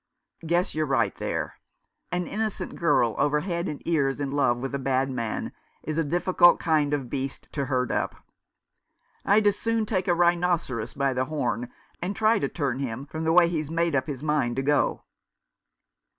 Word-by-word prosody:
" 165 - -14
Guess 175 +2 +1
you're 155 0 -1
right 130 -4 +1
there. - - -3 0.5
An 180 0 -1
innocent 215 +2 -3
girl 120 -9 +2
over 150 0 +2
head 170 0 -2
and 150 - -6
ears 140 -5 +1
in 140 -2 -2
love 140 -4 +2
with 135 +2 -5
a 140 - -1
bad 135 0 0
man 115 -4 -3 0.3
is 155 +1 -2
a - - +2
difficult 175 +3 +4
kind 155 -3 +2
of 140 -4 -1
beast 135 +1 -4
to 140 -2 -2
herd 125 -2 0
up. - - -1 1.1
I'd 210 +1 +4
as 205 - +3
soon 230 -1 0
take 190 -4 -1
a 175 - +3
rhinoceros 170 -9 +1
by 140 -1 +1
the 130 0 0
horn 125 -5 -2 0.3
and 185 +4 -2
try 220 0 +3
to - - -1
turn 135 -5 -2
him 130 0 -4
from 160 +2 -5
the 160 - +3
way 175 0 +6
he's 155 -3 -2
made 165 -1 0
up 130 -1 0
his 140 -2 -5
mind 150 -6 +1
to 135 - -1
go." 145 +1 +1
150 Hz, 190 wpm, -26 LUFS, 135-175 Hz, 1.1 s, way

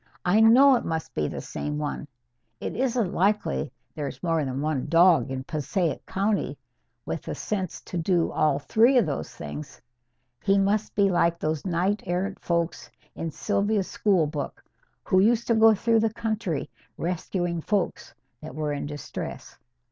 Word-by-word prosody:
I 190 +5 +4
know 250 +5 +7
it - - -4
must 160 -1 -3
be 75 - 0
the - - -5
same 150 0 -4
one. 150 0 -4 0.5
It - - -4
isn't 240 -5 0
likely 195 - +1 0.2
there's 150 +3 -6
more 165 -3 +1
than 130 -1 -3
one 150 -2 -1
dog 170 -2 +5
in 130 0 -4
Passaic 155 +2 -2
County 200 +2 -1 0.5
with - - -3
the - - -5
sense 190 -5 -3
to 175 - -5
do 170 0 +1
all 150 -3 +2
three 230 - +4
of 235 - +4
those 145 -3 -3
things. 150 -2 -8 0.6
He 195 0 +3
must 200 +2 +1
be 200 -1 +3
like 170 -1 +2
those 155 +1 -2
knight 185 +4 0
errant 185 +3 -2
folks 170 -1 -2 0.2
in 165 - -4
Sylvia's 200 +5 0
school 190 -6 +2
book, 150 -1 -5 0.4
who 185 - +3
used 230 +4 +3
to 235 - +2
go 220 0 +6
through 230 +2 +2
the 220 0 +1
country 220 -9 -2 0.3
rescuing 175 0 -2
folks 200 +2 -2 0.3
that 125 - -9
were 150 -1 -2
in 145 - -4
distress. 145 0 -7
180 Hz, 165 wpm, -26 LUFS, 155-210 Hz, 0.6 s, know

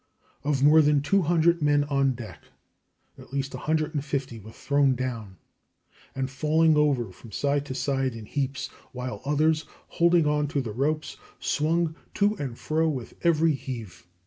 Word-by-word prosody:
Of 140 -2 0
more 155 +2 +7
than 145 -1 +3
200 170 0 +3
men 145 -1 +3
on 140 -2 +1
deck, 120 -3 -9 0.8
at - - -14
least 135 0 -3
150 145 -3 -2
were 110 +2 -12
thrown 140 +1 +1
down, 115 -7 -5 0.8
and 135 0 -1
falling 155 +4 +2
over 140 -8 +2
from 110 +5 -14
side 140 +5 0
to 130 - -5
side 135 -1 -1
in 110 -2 -8
heaps, 135 +2 -3 0.2
while 125 0 -5
others, 155 +2 +2 0.4
holding 170 -1 +5
on 150 0 +1
to 140 -1 -1
the 115 -5 -5
ropes, 150 +5 -1 0.2
swung 160 +2 0 0.2
to 205 +1 +3
and 130 -7 -5
fro 160 +1 0
with 130 -6 -5
every 165 -1 +3
heave. 115 -10 -7
145 Hz, 150 wpm, -26 LUFS, 130-155 Hz, 0.8 s, more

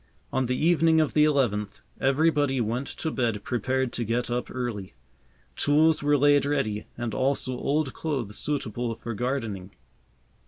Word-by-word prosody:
On 130 -1 +1
the 125 +1 0
evening 165 0 +4
of 155 - +1
the 150 0 +5
eleventh, 120 -9 0 0.2
everybody 145 0 +2
went 120 +4 -1
to 160 - -4
bed 115 -6 -1
prepared 130 +2 -1
to 120 - -2
get 120 +2 -1
up 125 +1 -2
early. 120 -7 -5 0.6
Tools 155 +2 +3
were 145 0 +3
laid 145 +1 +4
ready, 135 -8 -1
and 120 -2 -3
also 130 +2 0
old 140 +1 -1
clothes 130 -10 -3
suitable 120 -5 -2
for 115 +1 -6
gardening. 110 -6 -3
130 Hz, 150 wpm, -26 LUFS, 115-145 Hz, 0.6 s, the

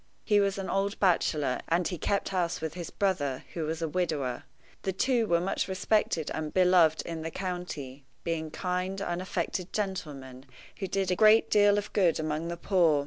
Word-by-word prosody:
He 210 -2 +4
was 200 -1 +1
an 195 -1 -4
old 195 +2 -1
bachelor, 155 -7 +2
and 170 +1 +1
he 180 - -4
kept 200 +5 0
house 180 -3 -1
with 160 -1 -4
his 175 -1 -6
brother, 145 -10 -1
who 165 -2 -2
was 160 +2 -3
a - - 0
widower. 150 -7 -2 0.4
The 190 - -2
two 235 +3 +1
were 170 -2 +3
much 180 +3 -1
respected 190 -4 0
and 155 -1 -3
beloved 180 -4 +4
in 165 -1 -5
the 160 - -3
county, 165 -7 -5 0.2
being 160 -2 -2
kind, 180 +3 -2
unaffected 180 0 -3
gentlemen, 145 -10 -4 0.3
who 195 - -2
did 190 0 -1
a - - +2
great 215 +3 +5
deal 205 -1 +5
of 205 0 -3
good 175 -6 +3
among 155 +1 -2
the 170 0 -4
poor. 170 -5 +3
175 Hz, 185 wpm, -29 LUFS, 160-195 Hz, 0.4 s, great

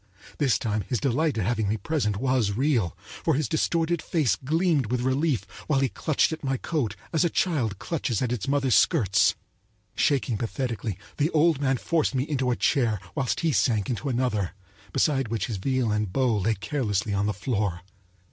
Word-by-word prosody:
This 140 -5 +3
time 110 -4 -1
his 115 +5 -2
delight 140 +1 +1
at 110 - 0
having 110 -2 0
me 110 - 0
present 105 - -1
was 125 -4 +1
real; 120 - +1 0.3
for 160 - +2
his 150 +2 0
distorted 165 +1 0
face 155 -8 +1
gleamed 155 - +1
with 125 +2 -1
relief 130 -2 +1 0.2
while 145 -3 +2
he 135 -1 +2
clutched 155 +4 +1
at 160 - -5
my 135 -1 0
coat 125 -8 -2 0.2
as 160 - +3
a 175 - +2
child 135 - 0
clutches 125 - -2
at 125 -2 -1
its 120 -6 -3
mother's 135 -2 +2
skirts. 100 - +4 0.6
Shaking 130 -6 +1
pathetically, 115 -4 -3 0.2
the 150 +2 +2
old 160 -3 +3
man 135 -2 +2
forced 155 +1 0
me 130 - +1
into 135 -4 -1
a 125 - +2
chair 115 -8 +1
whilst 130 -3 -1
he 165 -2 +2
sank 115 -4 +1
into 115 +3 -3
another, 120 -7 -1 0.4
beside 135 - +1
which 115 0 -2
his 110 -5 -4
viol 125 +2 0
and 105 -2 -1
bow 125 +1 +2
lay 105 +2 +1
carelessly 105 -5 -1
on 100 +1 +1
the - - +1
floor. 100 -5 -1
130 Hz, 185 wpm, -26 LUFS, 110-145 Hz, 0.6 s, skirts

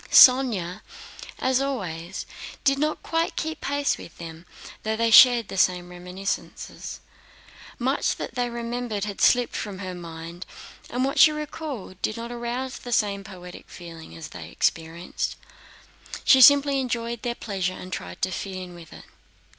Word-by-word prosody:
Sónya, 225 - +6 0.6
as 260 0 +1
always, 190 -10 -4 0.4
did 275 -1 +3
not 305 +1 -1
quite 330 0 0
keep 315 0 -3
pace 285 0 0
with 165 - -12
them, 165 0 -9 0.3
though 220 0 -1
they 230 +1 +1
shared 240 -2 +8
the 195 - -4
same 180 -1 +2
reminiscences. 180 +2 -5 0.8
Much 260 +3 0
that - - -6
they 245 0 -1
remembered 235 -3 -3
had 205 -2 -4
slipped 245 -1 +4
from 205 -3 -4
her 185 -1 -5
mind, 170 0 -8 0.5
and 250 +2 0
what 275 - -1
she 310 - +9
recalled 295 - -6
did 215 - -1
not 235 +1 -6
arouse 240 +2 -4
the 245 - -8
same 200 -3 +1
poetic 180 -3 -11
feeling 165 - -10
as 80 - -8
they - - -9
experienced. 165 +2 -2 0.9
She 265 - +7
simply 280 +1 +7
enjoyed 235 -2 -2
their 240 -1 -2
pleasure 190 -5 -3
and 185 0 -8
tried 90 0 -6
to 185 - +1
fit 190 +1 -4
in 185 -1 -7
with 170 -2 -13
it. - - -12
215 Hz, 155 wpm, -25 LUFS, 180-255 Hz, 0.9 s, she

